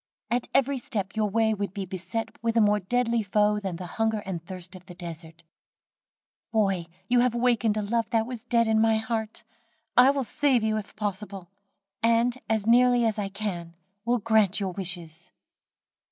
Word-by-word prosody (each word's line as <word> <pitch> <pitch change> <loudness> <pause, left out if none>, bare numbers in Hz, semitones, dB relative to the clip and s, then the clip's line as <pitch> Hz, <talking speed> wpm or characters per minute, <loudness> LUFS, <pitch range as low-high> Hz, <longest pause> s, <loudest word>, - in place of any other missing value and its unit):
At 240 0 0
every 275 0 +2
step 205 -4 -3
your 215 -1 +1
way 220 +1 +2
would 200 -2 -4
be 195 -1 -3
beset 190 +5 -4
with 230 0 0
a - - +6
more 210 -1 +4
deadly 235 +3 0
foe 210 +1 +2
than 190 -4 -4
the 180 +1 -7 0.2
hunger 220 -2 +1
and 175 -4 -4
thirst 185 +1 -8
of 185 - -11
the 180 - -10
desert. 170 -1 -9 1.1
"Boy, 195 -6 +1 0.2
you 245 0 +3
have 245 -1 +2
wakened 235 -3 +2
a 210 - -1
love 230 +2 -1
that 225 -2 +1
was 245 -2 -7
dead 235 -1 +2
in 220 0 +3
my 225 0 +4
heart. 220 -1 -3 0.5
I 250 +2 +7
will 275 -1 +1
save 260 -1 +1
you 215 0 +1
if 210 -2 -7
possible, 200 -3 -5 0.5
and, 230 +1 +3
as 220 -2 +1
nearly 245 +1 +5
as 220 -1 0
I 200 -1 -2
can 185 -5 -5 0.3
will 240 +1 +2
grant 220 -3 +2
your 195 -2 -2
wishes." 175 -2 -6
215 Hz, 180 wpm, -26 LUFS, 190-230 Hz, 1.1 s, I